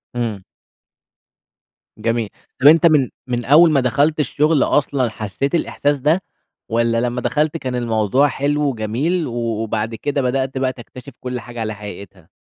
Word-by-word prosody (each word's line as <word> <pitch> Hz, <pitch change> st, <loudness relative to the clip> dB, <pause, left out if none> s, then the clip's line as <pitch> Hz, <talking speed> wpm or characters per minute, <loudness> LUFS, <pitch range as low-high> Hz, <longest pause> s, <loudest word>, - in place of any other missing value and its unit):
إمم. 110 Hz, -5 st, -3 dB, 1.5 s
جميل. 115 Hz, -2 st, -1 dB, 0.3 s
طَب 140 Hz, -, +7 dB
أنت 165 Hz, +2 st, +7 dB
من 150 Hz, -6 st, +4 dB, 0.2 s
من 120 Hz, -1 st, -2 dB
أول 160 Hz, +5 st, +6 dB
ما 140 Hz, -, +3 dB
دخلت 140 Hz, +5 st, +1 dB
الشُغل 150 Hz, +1 st, +2 dB
أصلًا 140 Hz, -4 st, +1 dB
حسّيت 115 Hz, -, -3 dB
الإحساس 145 Hz, -3 st, 0 dB
ده؟ 155 Hz, +7 st, +1 dB, 0.5 s
والّا 115 Hz, 0 st, +1 dB
لمّا 125 Hz, 0 st, -2 dB
دخلت 150 Hz, +4 st, 0 dB
كان 130 Hz, -5 st, -4 dB
الموضوع 120 Hz, +3 st, +2 dB
حلو 145 Hz, +1 st, -1 dB
وجميل 135 Hz, +9 st, -1 dB
و -, -, -6 dB
وبعد 115 Hz, -1 st, -2 dB
كده 140 Hz, +4 st, -2 dB
بدأت 130 Hz, +1 st, -1 dB
بقى 130 Hz, -1 st, 0 dB
تكتشف 125 Hz, +2 st, -12 dB
كل 125 Hz, -1 st, -4 dB
حاجة 120 Hz, 0 st, -9 dB
على 110 Hz, -1 st, -2 dB
حقيقتها؟ 100 Hz, -4 st, -11 dB
125 Hz, 150 wpm, -19 LUFS, 115-145 Hz, 1.5 s, طَب